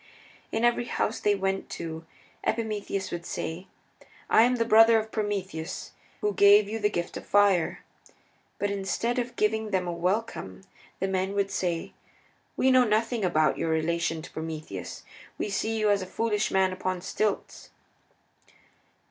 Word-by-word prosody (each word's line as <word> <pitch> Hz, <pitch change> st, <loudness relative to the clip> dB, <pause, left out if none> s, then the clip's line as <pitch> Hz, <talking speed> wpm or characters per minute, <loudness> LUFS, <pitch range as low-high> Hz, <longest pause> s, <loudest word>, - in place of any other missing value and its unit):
In 225 Hz, +2 st, +1 dB
every 240 Hz, 0 st, +2 dB
house -, -, -1 dB
they 205 Hz, 0 st, +2 dB
went 195 Hz, 0 st, -2 dB
to 165 Hz, -1 st, -6 dB, 0.4 s
Epimetheus 210 Hz, -4 st, -2 dB
would 170 Hz, 0 st, -4 dB
say, 170 Hz, +1 st, -5 dB, 0.6 s
"I -, -, +7 dB
am 245 Hz, +2 st, +4 dB
the 230 Hz, -1 st, +1 dB
brother 225 Hz, 0 st, +7 dB
of 220 Hz, 0 st, -3 dB
Prometheus, 195 Hz, -6 st, -3 dB, 0.3 s
who 210 Hz, 0 st, +1 dB
gave 200 Hz, +1 st, +6 dB
you 220 Hz, +2 st, -3 dB
the 210 Hz, -1 st, +2 dB
gift 175 Hz, -4 st, -3 dB
of -, -, -9 dB
fire." 200 Hz, -4 st, +3 dB, 0.7 s
But 205 Hz, 0 st, -1 dB
instead 200 Hz, +5 st, -1 dB
of 245 Hz, 0 st, -4 dB
giving 220 Hz, +1 st, 0 dB
them 190 Hz, -3 st, 0 dB
a -, -, -1 dB
welcome 185 Hz, +5 st, -2 dB, 0.4 s
the 190 Hz, -, 0 dB
men 190 Hz, +1 st, -1 dB
would 200 Hz, -1 st, 0 dB
say, 175 Hz, -3 st, -2 dB, 0.6 s
"We 265 Hz, -, +4 dB
know 255 Hz, -1 st, +6 dB
nothing 225 Hz, 0 st, +1 dB
about 155 Hz, -4 st, +2 dB
your 165 Hz, -, -1 dB
relation 160 Hz, 0 st, 0 dB
to -, -, -10 dB
Prometheus. 160 Hz, -1 st, -6 dB, 0.3 s
We -, -, -2 dB
see 220 Hz, +3 st, -1 dB
you 210 Hz, -1 st, +3 dB
as 200 Hz, -1 st, +2 dB
a 185 Hz, -, -5 dB
foolish 210 Hz, 0 st, 0 dB
man 190 Hz, -1 st, +2 dB
upon 185 Hz, -1 st, -3 dB
stilts." 210 Hz, +3 st, -2 dB
200 Hz, 155 wpm, -27 LUFS, 180-220 Hz, 0.7 s, I